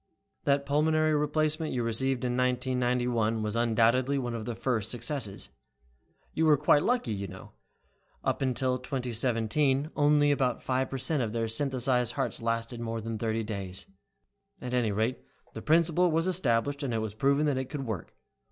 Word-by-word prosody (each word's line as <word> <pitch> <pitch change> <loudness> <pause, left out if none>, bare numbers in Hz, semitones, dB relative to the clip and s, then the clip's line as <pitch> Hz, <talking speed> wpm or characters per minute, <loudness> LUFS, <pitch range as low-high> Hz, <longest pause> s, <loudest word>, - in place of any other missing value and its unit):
"That 140 0 +2
pulmonary 155 +2 +2
replacement 155 +1 0
you 125 -2 -1
received 125 +2 0
in 125 - 0
1991 125 -3 0
was 105 +1 -2
undoubtedly 120 +4 +2
one 125 -3 -2
of 115 -2 -4
the 120 -1 -4
first 110 -5 -1
successes. 115 -3 -3 0.8
You 160 0 +2
were 150 -1 +6
quite 145 0 +4
lucky, 235 - 0
you 100 -1 -4
know. 95 +1 -11 0.7
Up - - -1
until 130 -1 0
2017, 125 +3 0
only 145 0 +4
about 130 -3 0
five 130 0 0
per 135 - -3
cent 135 +3 0
of 110 -3 -2
their 115 -1 -1
synthesized 125 0 0
hearts - - -2
lasted 115 +1 -2
more 115 -1 -3
than 110 0 -5
thirty 115 0 -1
days. 100 -3 -5 0.7
At 125 0 -6
any 120 -4 +1
rate, 110 +5 0 0.3
the 110 - -6
principle 170 +4 +3
was 165 +1 +1
established, 140 -6 0
and 130 -5 -2
it - - +1
was 110 -2 -3
proven 140 +6 +2
that 140 -3 +1
it 130 - -2
could 140 -3 -4
work. 110 -8 -5
125 Hz, 170 wpm, -29 LUFS, 115-145 Hz, 0.8 s, were